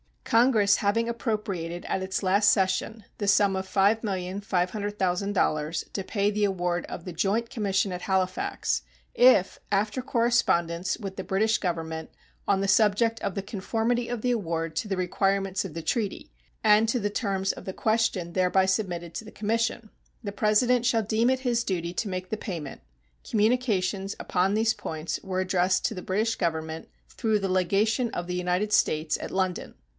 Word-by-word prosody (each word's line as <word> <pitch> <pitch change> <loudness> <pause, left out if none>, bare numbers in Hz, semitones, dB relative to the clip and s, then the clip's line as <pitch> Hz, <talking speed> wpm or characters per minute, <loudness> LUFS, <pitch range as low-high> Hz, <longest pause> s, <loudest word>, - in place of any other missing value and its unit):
Congress 225 -4 +4
having 225 +3 +1
appropriated 200 -8 -3
at 190 - -1
its 190 +1 -2
last 200 +3 +4
session 195 +3 0
the 205 - -3
sum 200 0 +4
of 190 0 -3
$5,500,000 195 -4 0
to 195 - -3
pay 205 0 0
the 210 0 +1
award 175 -3 -1
of 170 - -7
the 180 - -5
joint 210 +7 0
commission 200 -3 0
at 180 0 -5
Halifax, 185 -1 0 0.3
if, - - +5
after 210 +5 +1
correspondence 230 -9 +1
with 195 -3 -7
the 190 - -3
British 215 +4 +1
Government 160 -3 -3 0.4
on 195 -1 +2
the 195 - 0
subject 220 +3 +3
of 195 - -3
the 195 - -1
conformity 225 +4 -1
of 240 -2 -4
the 250 - +1
award 165 -7 -2
to 220 - -1
the 195 - -1
requirements 195 +1 0
of 180 - -7
the 165 - -5
treaty 205 +4 -2 0.3
and 215 +1 +5
to 230 - +1
the 205 -1 -1
terms 195 -3 -1
of - - -11
the 190 - -4
question 220 -6 0
thereby 185 +1 +2
submitted 180 -4 -2
to 225 - -5
the 220 - -10
commission, 225 +1 -1 0.3
the 200 - -3
President 220 +4 +2
shall 230 -3 +2
deem 220 +3 +2
it 260 0 +1
his 240 -2 +1
duty 175 -2 -2
to 210 - -2
make 185 0 -4
the 220 - -2
payment, 165 -10 -6 0.5
communications 210 -4 +1
upon 185 +2 0
these 220 +1 +2
points 160 -5 -4
were 185 -1 -2
addressed 185 0 +1
to - - 0
the 180 - -6
British 215 +5 0
Government 160 -2 -2 0.2
through 220 -2 0
the 195 -2 -2
legation 210 +6 +1
of 175 - -4
the 180 - -3
United 180 +4 0
States 155 -4 +2
at - - -5
London. 185 -1 -2
195 Hz, 170 wpm, -27 LUFS, 185-220 Hz, 0.5 s, if